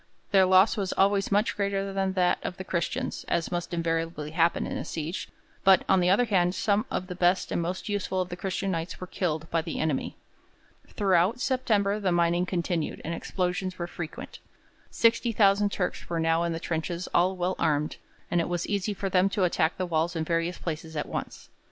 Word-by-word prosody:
Their 190 -2 +5
loss 190 +4 +5
was 195 -3 -1
always 195 0 +2
much 205 +3 +2
greater 200 -1 -1
than 195 -1 0
that 180 -2 +2
of 180 - -5
the 190 - -5
Christians, 170 -2 -2
as 170 - -1
must 175 -1 -3
invariably 165 -2 -2
happen 165 +1 +2
in - - -4
a - - -3
siege; 160 +2 -4 0.3
but, 190 -1 +6
on 190 - +4
the 180 0 +3
other 205 +6 +4
hand, 180 -4 +2
some 210 0 +1
of 180 - -2
the 185 - -6
best 180 +1 +1
and - - 0
most 180 +2 -3
useful 200 -2 -1
of 185 -1 -1
the 175 - -4
Christian 190 +1 -2
Knights 165 0 -4
were 185 - -5
killed 160 -3 -2
by 165 - +2
the 165 0 -5
enemy. 155 -4 -1 0.7
Throughout 195 +3 +2
September 215 -6 +1
the 195 -3 0
mining 175 +1 +2
continued, 170 -3 -2
and 165 - -2
explosions 185 +1 -2
were 175 - -3
frequent. 170 -2 -7 0.5
Sixty 230 +1 +2
thousand 205 -1 +3
Turks 180 -3 -3
were 170 -1 -1
now 165 0 +2
in 170 - -1
the 165 - -3
trenches 170 +2 -3
all 185 +2 +3
well 180 +1 -1
armed, 150 0 0 0.3
and 175 - +3
it 165 - -3
was 175 -1 -1
easy 205 0 -1
for 195 - -3
them 190 +1 +3
to 195 -1 0
attack 170 -2 +1
the 185 - -1
walls 165 0 0
in 160 - -1
various 165 +2 -1
places 160 -1 -5
at 150 - -1
once. - - -6
180 Hz, 205 wpm, -27 LUFS, 170-195 Hz, 0.7 s, but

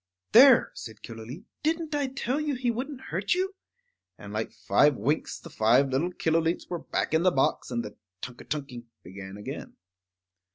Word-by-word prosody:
"There!" 255 +2 +8
said 110 -2 -10
Killooleet, 115 - -8 0.2
"didn't 320 0 -1
I 290 -2 +1
tell 265 +2 -2
you 295 -2 -1
he 250 -1 0
wouldn't 260 +3 -5
hurt 190 - +1
you?" 380 +2 -1 0.6
And - - -10
like - - -2
five 145 -2 +3
winks 135 +8 -1
the - - -12
five 120 +6 +4
little 140 +7 0
Killooleets 165 0 0
were 175 - -2
back - - -2
in 160 - +4
the 185 - +5
box, 135 -6 +1
and 120 -2 -2
the 105 - -9 0.2
tunk 125 +5 -8
a - - -10
tunking 135 -5 -5 0.2
began 95 +1 -9
again. 105 - -7
160 Hz, 175 wpm, -27 LUFS, -, 0.6 s, There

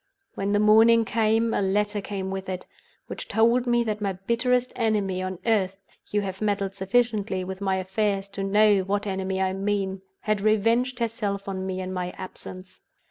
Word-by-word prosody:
When 200 +1 -2
the 205 - +3
morning 225 +2 +6
came, 225 +1 +1
a - - +1
letter 205 +2 0
came 195 -1 -4
with 190 0 -5
it, 185 -1 -4 0.4
which - - -7
told 235 +3 +3
me 240 0 +3
that 215 -2 -3
my 200 -2 0
bitterest 240 +6 0
enemy 205 -5 0
on 185 0 -4
earth 200 -5 +2 0.3
(you 210 - +1
have 190 0 -5
meddled 200 -2 0
sufficiently 200 -1 0
with 190 +1 -6
my 190 -1 +1
affairs 195 +1 -1
to 195 0 -5
know 205 +1 +4
what 200 +2 -1
enemy 190 -1 -2
I 190 0 +1
mean) 195 -1 -1 0.2
had 215 -2 0
revenged 230 +4 +2
herself 215 -4 -2
on 190 -1 -3
me 185 0 -3
in 185 0 -4
my 180 -1 -4
absence. 185 0 -9
200 Hz, 180 wpm, -25 LUFS, 190-220 Hz, 0.4 s, morning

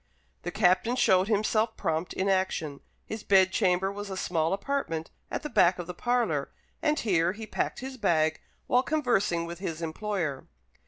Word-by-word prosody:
The 175 - -4
Captain 185 +7 +2
showed 190 -6 +4
himself 215 +1 +1
prompt 160 +2 -1
in 190 - -1
action. 185 -7 0 0.3
His 220 0 -5
bedchamber 190 -1 +3
was 205 0 -6
a 190 - -4
small 165 -3 0
apartment 195 - -2 0.2
at - - -4
the - - -2
back 180 -8 +4
of 175 - -5
the 180 - -6
parlour, 205 - 0 0.3
and 300 0 +2
here 175 -5 +2
he 220 +2 -7
packed - - -2
his 260 0 -6
bag 160 -7 +1 0.2
while 250 - +3
conversing 240 - +1
with 170 +1 -7
his 165 -4 -4
employer. 165 -3 -3
190 Hz, 165 wpm, -28 LUFS, 170-220 Hz, 0.3 s, showed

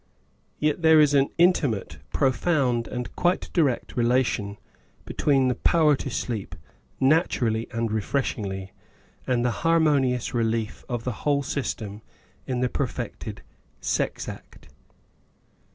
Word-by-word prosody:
Yet 150 +2 0
there 160 -1 +6
is 150 -1 +5
an 140 -1 +4
intimate, 165 - +2
profound 130 -4 +1
and 125 -1 -5
quite 180 +1 0
direct 145 -8 +1
re 120 - +1
lation 120 -5 +1 0.5
between 135 -3 +2
the 125 - +2
power 155 +1 +3
to 135 - -5
sleep, 110 -8 -4 0.4
naturally 130 -6 +2
and 115 -1 -1
re 110 0 0
freshingly, 100 -6 -2 0.6
and 125 -1 +1
the 125 - +2
harmonious 145 -7 +2
relief 115 -2 -1
of 120 -2 -3
the 125 - -1
whole 140 -1 +1
system 110 -7 -4 0.5
in 125 -1 -1
the 125 - +3
perfected 130 -2 -4 0.4
sex - - -1
act. - - -10
125 Hz, 125 wpm, -25 LUFS, 115-145 Hz, 0.6 s, there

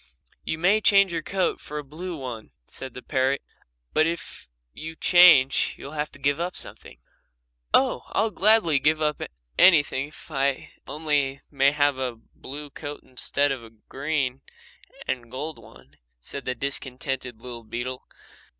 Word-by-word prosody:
"You 160 - -2
may 190 +6 +3
change 195 -3 +5
your 165 - -1
coat 190 +3 -1
for 150 - -7
a 150 - -3
blue 165 +5 -6
one," 125 -5 -7 0.2
said 130 -2 -8
the 125 - -8
parrot, 135 0 +1 0.5
"but 155 - +4
if 170 +1 -5 0.3
you 160 +1 -7
change 165 -7 +6
you'll 140 - -9
have 150 0 -2
to - - -10
give 140 +2 +1
up 175 +1 -2
something." - - -5 0.7
"Oh, - - +3
I'll 220 - 0
gladly 200 -8 +4
give 155 +3 +3
up 150 -1 0 0.4
anything 145 -6 +5
if 155 +1 -15 0.6
only 145 -3 0
I 140 - -24
may 140 -1 +4
have 145 -2 +2
a 125 -2 -2
blue 140 +5 -10
coat 145 +1 -7
instead 140 +2 0
of 130 -3 -4
a 115 - -11
green 135 +3 -3 0.7
and 120 -2 -3
gold 145 +6 -5
one," 65 +3 -17 0.2
said 135 - -6
the 125 - -1
discontented 130 -2 -4
little 120 -1 -8
beetle. 120 +3 -5
140 Hz, 155 wpm, -25 LUFS, 130-160 Hz, 0.7 s, change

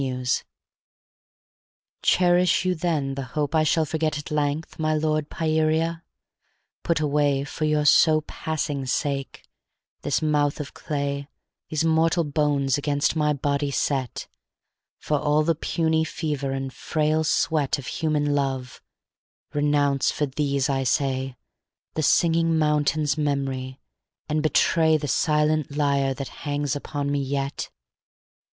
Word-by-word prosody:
XII 130 -1 -3 1.8
Cherish 180 0 +3
you 185 - +2
then 155 -5 -1
the 135 - -4 0.2
hope 145 0 0
I 160 - +4
shall 155 +1 +2
forget 155 0 -1
At 150 - -7
length, 150 +2 -2
my 155 0 +1
lord, 155 -1 0
Pieria? 160 +1 0 0.8
put 170 -3 0
away 145 -2 +1
For 155 +2 -3
your 150 -1 +1
so 155 +2 +5
passing 150 -3 -3
sake, 135 0 -2 0.6
this - - 0
mouth 150 -2 +1
of 140 -3 -6
clay 140 -1 -3 0.4
These 155 +1 0
mortal 165 +1 +3
bones 145 -2 +1
against 145 +1 0
my 150 -1 +2
body 145 0 -1
set, 135 -2 -1 0.7
For 150 -1 -1
all 150 +1 +2
the 165 +2 +2
puny 160 0 0
fever 150 -4 -3
and 135 -1 -4
frail 155 0 0
sweat 150 -2 +1
Of 140 - -8
human 150 -2 0
love, 135 -3 -2 0.7
renounce 145 -2 +2
for 150 - 0
these, 140 0 -1
I 135 -2 0
say, 130 0 0 0.6
The 155 - -1
Singing 165 +1 +3
Mountain's 150 -1 +1
memory, 135 -3 -2 0.5
and 155 0 0
betray 160 +1 +3
The 150 -1 -4
silent 150 0 +1
lyre 140 -2 +1
that 140 0 -5
hangs 145 -1 -1
upon 145 0 -3
me 145 - 0
yet? 140 0 -3
150 Hz, 130 wpm, -24 LUFS, 140-155 Hz, 1.8 s, so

